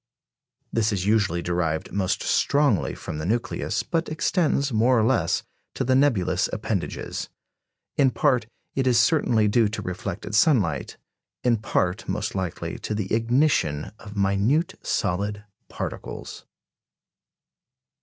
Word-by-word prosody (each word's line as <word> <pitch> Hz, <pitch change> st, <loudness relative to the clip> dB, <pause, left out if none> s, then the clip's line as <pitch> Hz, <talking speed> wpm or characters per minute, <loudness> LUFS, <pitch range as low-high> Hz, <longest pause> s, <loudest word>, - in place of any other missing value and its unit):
This 110 Hz, -1 st, +2 dB
is 95 Hz, -3 st, -1 dB
usually 100 Hz, -5 st, +2 dB
derived 85 Hz, -2 st, -1 dB
most 100 Hz, 0 st, 0 dB
strongly 140 Hz, -, +2 dB
from 75 Hz, -, -6 dB
the 75 Hz, -, -4 dB
nucleus, 115 Hz, +3 st, -1 dB
but 165 Hz, 0 st, -1 dB
extends, 155 Hz, -3 st, +1 dB
more 120 Hz, +3 st, +4 dB
or 110 Hz, -, +3 dB
less, 115 Hz, +2 st, +1 dB, 0.3 s
to -, -, -1 dB
the 130 Hz, -, +2 dB
nebulous 130 Hz, -9 st, +2 dB
appendages. -, -, -3 dB, 0.7 s
In 140 Hz, -2 st, +5 dB
part, 125 Hz, -5 st, +1 dB, 0.3 s
it 135 Hz, -1 st, 0 dB
is 120 Hz, -2 st, +4 dB
certainly 120 Hz, -5 st, +3 dB
due 110 Hz, +1 st, +3 dB
to 105 Hz, +1 st, -4 dB
reflected 95 Hz, +2 st, -5 dB
sunlight; 105 Hz, -, +2 dB, 0.5 s
in 120 Hz, -2 st, +3 dB
part, 95 Hz, -1 st, -1 dB
most 105 Hz, +4 st, -2 dB
likely, 95 Hz, -4 st, -4 dB
to 105 Hz, -, -3 dB
the 105 Hz, -2 st, -3 dB
ignition 115 Hz, -, +1 dB
of 105 Hz, -2 st, -10 dB
minute 100 Hz, -, +2 dB
solid 100 Hz, +1 st, -1 dB, 0.3 s
particles. -, -, -6 dB
110 Hz, 125 wpm, -25 LUFS, 95-130 Hz, 0.7 s, In